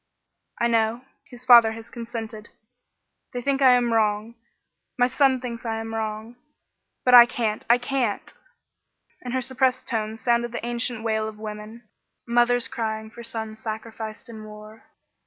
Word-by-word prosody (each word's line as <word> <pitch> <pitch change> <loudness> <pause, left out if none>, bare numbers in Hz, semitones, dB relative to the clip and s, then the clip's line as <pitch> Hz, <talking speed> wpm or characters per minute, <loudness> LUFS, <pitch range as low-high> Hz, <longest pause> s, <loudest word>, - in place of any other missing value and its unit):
"I 235 - +2
know. 230 0 +1 0.3
His 245 -1 -9
father 235 -3 +8
has 225 0 -11
consented; 230 -2 -7 0.8
they 245 - -3
think 275 +1 0
I 260 -2 +7
am 240 -2 +2
wrong. 215 0 +1 0.6
My 245 - +4
son 265 0 +2
thinks 240 -1 -6
I 225 -2 -2
am 225 0 -6
wrong. 220 +1 -4 0.7
But 250 - +4
I 240 -1 +11
can't! 220 -3 -2
I 235 - +7
can't!" 245 -3 -2 0.9
In 250 - -6
her 260 - 0
suppressed 260 0 0
tones 220 -2 -3
sounded 240 0 +1
the 235 - -4
ancient 240 -1 -2
wail 220 -1 0
of 215 -1 -8
women 215 +2 -8 0.4
mothers 240 0 +2
crying 220 -3 -4
for - - -22
their 235 - -7
sons 220 -1 -5
sacrificed 220 0 -6
in 220 -2 -9
war. 215 +1 -12
230 Hz, 155 wpm, -24 LUFS, 220-245 Hz, 0.9 s, I